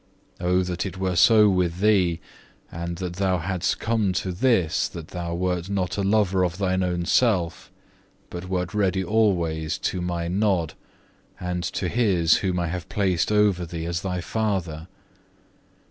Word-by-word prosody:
Oh 90 +1 +2
that 90 -1 -3
it 95 -2 -6
were 95 -1 -1
so 105 +3 +6
with 90 -3 +1
thee, 95 -5 +3 0.5
and 85 +1 -5
that 90 -1 -5
thou 95 -2 +1
hadst 90 +1 -1
come 110 -4 0
to 95 +1 -2
this, 95 -4 +1
that 85 -5 -9
thou 85 -1 -4
wert 90 0 -2
not 90 -3 -1
a 100 - -1
lover 95 -2 +2
of 90 -1 -1
thine 95 -1 0
own 90 -1 -1
self, 90 -7 +1 0.6
but 90 +1 -7
wert 90 +1 -2
ready 95 -2 +1
always 85 -6 +1
to 90 -1 -2
My 85 -1 -2
nod, 95 -3 0 0.7
and 90 -1 -3
to 95 - -2
his 95 -6 +3
whom 90 -2 -1
I 85 - 0
have 90 0 -5
placed 95 -2 0
over 105 -4 +3
thee 85 -1 -5
as 85 0 -2
thy 90 -2 -3
father. 90 -7 -2
90 Hz, 160 wpm, -24 LUFS, 85-100 Hz, 0.7 s, so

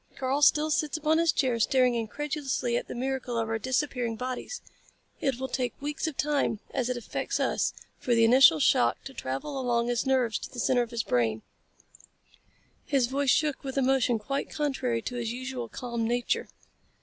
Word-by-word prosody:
Karl 270 +2 0
still 305 +1 +4
sits 305 0 0
upon 315 +1 +2
his 335 -2 +4
chair 255 -5 0
staring 255 +2 +3
incredulously 260 +2 -2
at - - -2
the - - -6
miracle 255 -1 -2
of 225 -1 0
our 225 0 -1
disappearing 250 -1 -1
bodies. 255 - -5 0.6
It 270 -3 -1
will 265 - -2
take 250 -1 -3
weeks 295 +2 -3
of 310 - -5
time, 290 -7 0
as 255 -2 -1
it 250 - -1
affects 240 - -3
us, - - +1 0.3
for 245 - +1
the 230 - +4
initial 245 - +7
shock 120 -4 +3
to 270 - -9
travel 235 - -4
along 240 -1 +1
his 240 +2 0
nerves 255 -4 +2
to - - -7
the 245 - -8
center 245 +1 +2
of 240 - -3
his 230 -2 -2
brain." 110 -3 0 1.4
His 275 -4 +3
voice 275 +2 -1
shook 300 +2 +2
with 270 0 -5
emotion 260 -3 +2
quite 275 +6 -3
contrary 260 -6 -1
to 245 - -4
his 235 -2 -2
usual 255 -1 -5
calm 235 -1 -3
nature. 240 +1 0
255 Hz, 185 wpm, -28 LUFS, 235-275 Hz, 1.4 s, initial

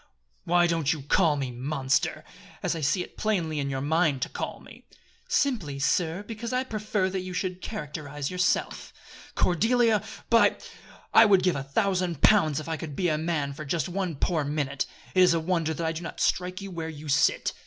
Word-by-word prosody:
"Why 175 0 +4
don't 165 -4 +1
you 150 -4 -7
call 160 +1 +3
me, 135 -3 -3
Monster! 130 +2 -1 0.4
as - - 0
I 165 - -4
see 155 +5 +1
it - - -15
plainly 170 -8 0
in 140 -1 -2
your 135 -1 -2
mind 150 -2 +1
to - - -3
call - - -5
me?" - - -15 0.4
"Simply, 215 - 0
sir, 165 +6 0
because 225 +2 -6
I 255 0 +1
prefer 215 -5 -1
that 190 - -2
you 185 0 -6
should 185 -1 -3
characterize 150 -7 -5
yourself." 180 0 0 0.4
"Cordelia! 225 +4 +3 0.3
By! 230 - +4 0.6
I 225 - +8
would 195 -4 +4
give 180 -1 +2
a 140 - -2
thousand 180 +2 -1
pounds 155 -9 +5
if 155 - -7
you 160 0 -3
could 150 -3 -6
be 180 +2 +1
a 155 - +1
man 155 -4 -1
for 155 - -7
just 155 +4 -1
one 180 -2 -2
poor 155 +2 0
minute! 140 -2 -2 0.3
It 185 - +4
is 180 -2 +6
a - - +2
wonder 165 -1 0
that 165 +2 -3
I 160 - +1
do 165 +1 -5
not 170 - -7
strike 180 +1 0
you 195 -1 -7
where 165 -2 -4
you 155 -1 -9
sit." 145 +1 +2
165 Hz, 200 wpm, -27 LUFS, 150-185 Hz, 0.6 s, I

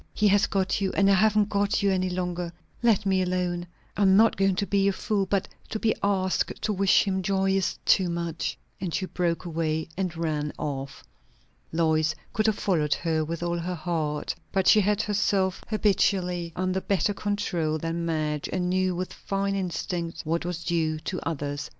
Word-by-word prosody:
"He 210 - +3
has 205 +1 +4
got 195 0 0
you, 195 - +1
and 200 0 +4
I - - +6
haven't 210 +1 +3
got 200 0 +1
you 200 - +3
any 185 -1 +1
longer. 180 -1 -3 0.3
Let 220 -4 +3
me 190 -1 +2
alone 180 -1 -1 0.3
I 205 - -2
am 190 -1 +6
not 225 +1 +5
going 195 -1 +2
to 200 - 0
be 200 0 +2
a - - +4
fool, 195 0 -1
but 195 0 0 0.2
to 220 - -2
be 220 0 +2
asked 190 -2 0
to 215 - +1
wish 195 0 +4
him 190 -2 -1
joy 195 0 +1
is 195 -1 0
too 185 -3 +4
much." 170 -1 -3 0.2
And 180 -4 -3
she 190 - -1
broke 175 -1 -1
away 160 -1 -2
and 180 -3 -2
ran 150 -3 -2
off. 135 -2 -5 0.7
Lois 160 -1 +2 0.2
could 215 +1 +1
have 215 - +2
followed 155 -7 +1
her 160 -2 0
with 165 +2 -4
all 170 0 -1
her 180 +2 -3
heart; 155 -3 -2 0.2
but 190 -2 +1
she 215 - +7
had 205 +1 +1
herself 195 -3 0
habitually 185 -5 +1
under 185 +1 -1
better 200 +1 +1
control 190 -6 -1
than 165 +2 -3
Madge, 155 -3 -1
and 180 -1 -1
knew 185 -1 +1
with 180 +1 -4
fine 195 0 -2
instinct 175 -2 -3
what 165 +2 -1
was 175 -1 -4
due 165 -2 0
to 180 +4 -4
others. 145 -2 -4
185 Hz, 190 wpm, -26 LUFS, 165-195 Hz, 0.7 s, she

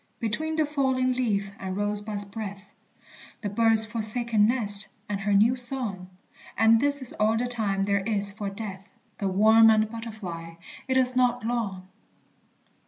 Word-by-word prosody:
Between 310 +8 -2
the 315 -1 +1
falling 260 -3 0
leaf 205 -6 -2
and 190 0 -5
rose 205 0 0
bud's 205 -1 -2
breath; 200 -1 -9 0.7
The 210 - -3
bird's 225 +1 +5
forsaken 220 0 +1
nest 215 -4 +3 0.2
and 205 -1 -3
her 205 +1 0
new 225 +5 +4
song 240 -7 -5 0.5
(And 225 +1 +4
this 285 +1 0
is 250 - -5
all 215 +1 +2
the 245 - -1
time 215 -5 -1
there 200 0 +1
is 200 0 0
for 205 0 -5
Death); 195 -1 -8 0.3
The 200 - -1
worm 220 +4 +5
and 215 0 +2
butterfly 195 -8 -8 0.3
it 260 0 0
is 255 -1 +2
not 245 -2 +1
long! 205 -6 -3
220 Hz, 160 wpm, -25 LUFS, 200-240 Hz, 0.7 s, bird's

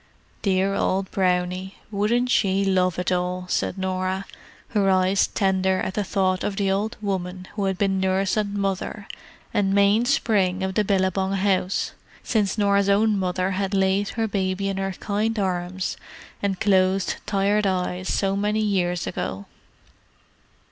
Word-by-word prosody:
"Dear 195 0 +1
old 190 -1 0
Brownie, 185 0 0 0.2
wouldn't 235 +5 +1
she 195 -2 +2
love 185 -2 +2
it 180 +1 -1
all!" 180 0 -1
said 185 - -1
Norah, 190 0 -2 0.4
her 200 -3 +2
eyes 190 +1 +3
tender 190 -1 +1
at 190 - -2
the 210 - -1
thought 185 -1 0
of 200 - -2
the 195 -1 +1
old 210 +4 -1
woman 185 -2 -3
who 205 -1 -2
had 190 -1 -1
been 195 -1 +1
nurse 190 0 +1
and 205 -2 -1
mother, 200 +1 -3 0.5
and 195 -1 +1
mainspring 200 -2 +2
of 190 0 -1
the 210 - +2
Billabong 190 -1 +1
house, 195 -1 0 0.3
since 210 -3 0
Norah's 200 -1 +3
own 210 +2 +3
mother 185 0 -1
had 195 +1 -1
laid 195 +1 +2
her 225 -1 +1
baby 195 -1 -1
in 195 - -3
her 195 0 -2
kind 215 +4 -2
arms 185 -1 -2 0.4
and 195 -2 -1
closed 190 -1 +2
tired 200 +1 +2
eyes 185 0 -2
so 195 -1 +1
many 210 +2 0
years 180 -4 0
ago. 95 +2 -4
195 Hz, 150 wpm, -24 LUFS, 185-200 Hz, 0.5 s, eyes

